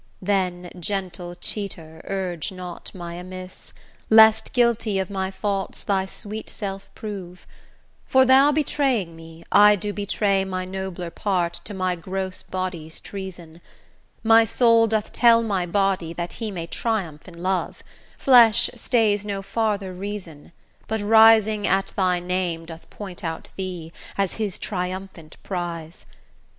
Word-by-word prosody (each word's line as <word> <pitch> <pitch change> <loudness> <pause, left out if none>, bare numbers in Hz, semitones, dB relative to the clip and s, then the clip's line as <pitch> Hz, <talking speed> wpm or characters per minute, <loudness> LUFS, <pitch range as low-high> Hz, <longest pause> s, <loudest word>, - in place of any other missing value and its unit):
Then, 180 -2 -1
gentle 180 -1 -4
cheater, 175 -4 -4
urge 185 -4 -3
not 180 -2 -8
my 175 -2 -7
amiss, 185 +1 -9 0.4
Lest 220 0 +6
guilty 235 -4 +2
of 190 0 -2
my 190 -1 -2
faults 195 0 -3
thy 190 -2 0
sweet 215 +3 -7
self 195 -2 -6
prove: 190 -4 -7 0.6
For, 260 0 +5
thou 270 +3 +6
betraying 270 - 0
me, 165 0 -13
I 210 0 +7
do 205 +1 -4
betray 200 -1 +1
My 185 -1 -3
nobler 185 -2 -5
part 175 -2 0
to 210 - -5
my 185 -1 0
gross 185 +2 -4
body's 180 -4 -5
treason; 175 -4 -8 0.6
My 225 0 +7
soul 230 0 +4
doth 220 -1 -1
tell 230 -1 +5
my 195 -5 -1
body 190 -3 0
that 170 +1 -5
he 220 - -2
may 175 -5 -5
Triumph 175 -5 -3
in 170 -1 -11
love; 185 -1 -1 0.3
flesh 235 -4 +6
stays 225 -4 +1
no 200 -1 -4
farther 200 -2 -1
reason, 180 -6 -7 0.4
But 220 -1 -1
rising 220 -1 +6
at 195 +1 +1
thy 180 -2 +1
name 175 -2 -2
doth 165 0 -11
point 190 -4 -9
out 165 -1 -5
thee, 180 -4 -6 0.2
As 195 -2 -1
his 210 -4 -2
triumphant 180 -3 -5
prize. 170 -3 -5
190 Hz, 140 wpm, -23 LUFS, 175-210 Hz, 0.6 s, I